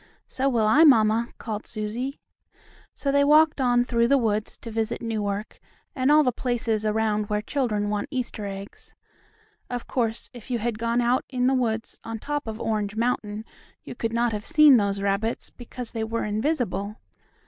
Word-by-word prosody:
"So 265 +1 0
will 230 -4 +2
I, 285 +9 +6
mamma," 230 -5 +5
called 215 -2 -5
Susie. 235 +6 -4 0.8
So 280 - -1
they 280 0 +4
walked 300 0 +5
on 245 -1 +3
through 235 -1 +2
the 280 - +4
woods 215 -4 -1
to 230 - -6
visit 225 +1 -2
Newark 210 -2 -3 0.4
and 260 0 +1
all 305 0 +6
the 250 - +2
places 230 -3 -1
around 215 -1 0
where 210 0 +1
children 215 -7 -1
want 205 0 -2
Easter 245 -6 -4
eggs. 195 0 -9 0.7
Of 245 -1 -4
course, 230 -3 -2
if 240 0 -12
you 245 - 0
had 230 -1 -2
gone 235 +1 +1
out 240 +2 +2
in 250 -2 0
the 265 - +3
woods 225 -3 -1
on 225 0 -5
top 290 +3 -4
of 220 0 -5
Orange 210 -2 -2
Mountain 220 -2 -1 0.4
you - - -8
could 230 -1 -3
not 235 0 +1
have 210 -1 -4
seen 305 -5 +7
those 200 -2 0
rabbits, 200 +3 -1
because 245 -1 -8
they 225 -2 -3
were 225 +1 -2
invisible. 215 - -1
230 Hz, 180 wpm, -25 LUFS, 215-250 Hz, 0.8 s, seen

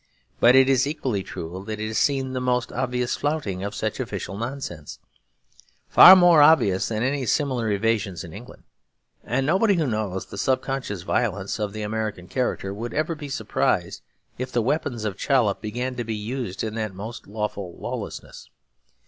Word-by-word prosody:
But 120 +2 +6
it 130 0 +6
is 135 0 +3
equally 130 - -2
true 90 +1 -7
that 110 -1 -4
it 110 - -2
has 110 - -1
seen 135 -2 +1
the 130 - -2
most 125 -1 0
obvious 125 -1 -1
flouting 140 -12 -2
of 100 +1 -4
such 110 0 -3
official 95 - -4
nonsense, 115 - -6 0.9
far 185 - +10
more 175 -4 +6
obvious 145 -12 +5
than 110 0 -2
any 135 0 -1
similar 130 -6 0
evasions 100 -3 0
in 85 - -10
England. 115 +6 -12 0.6
And 130 +3 -1
nobody 195 +6 +3
who 165 -3 +1
knows 105 -6 -2
the 100 - -8
subconscious 130 -6 -1
violence 100 -1 -1
of 105 -1 -2
the 110 +1 -5
American 105 -4 -3
character 110 -6 -2
would 115 +3 -6
ever 155 +2 0
be 150 -2 -8
surprised 140 - -1 0.4
if 130 0 -4
the 120 -2 +1
weapons 125 -4 -1
of 100 -2 -4
Chollop 120 -8 +2
began 120 +4 -3
to 120 - -2
be 110 -1 -3
used 105 -2 -4
in 110 -1 -3
that 110 -3 -4
most 110 +5 -8
lawful 100 -3 -4
lawlessness. - - -7
115 Hz, 175 wpm, -24 LUFS, 100-130 Hz, 0.9 s, far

